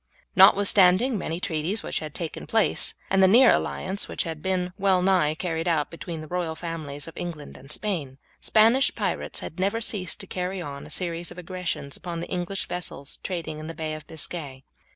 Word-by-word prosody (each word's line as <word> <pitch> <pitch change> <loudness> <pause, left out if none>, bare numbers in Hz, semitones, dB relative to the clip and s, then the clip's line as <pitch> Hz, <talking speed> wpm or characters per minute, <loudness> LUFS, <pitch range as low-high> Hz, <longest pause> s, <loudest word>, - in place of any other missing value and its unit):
Notwithstanding 195 +4 +6
many 170 -4 -3
treaties 175 +4 0
which - - -2
had 155 -2 -7
taken 165 -3 -4
place, 225 -1 +3 0.2
and 195 0 +4
the 190 - +7
near 240 +6 +7
alliance 190 +2 0
which - - -2
had 160 -4 -5
been 180 0 -1
well 190 -2 +3
nigh 180 -5 +3
carried 165 0 -2
out 160 -4 +1
between 165 -1 -6
the 155 - -8
royal 175 -1 -2
families 155 -4 -5
of 165 - -10
England 160 -4 -6
and 135 - -11
Spain, 150 -8 -3 0.2
Spanish 230 +6 +4
pirates - - -2
had - - -7
never 200 +4 +1
ceased 205 -7 -3
to - - -5
carry 185 +1 -3
on 140 -5 -6
a - - -13
series 170 -1 -2
of - - -10
aggressions 180 -6 -4
upon 175 -2 -5
the 170 - -6
English 180 +2 -2
vessels 175 -5 -5
trading 165 -4 -4
in 155 - -7
the 165 - -6
Bay 155 -1 -3
of 155 -1 -8
Biscay. 145 -4 -5
175 Hz, 195 wpm, -26 LUFS, 160-190 Hz, 0.2 s, the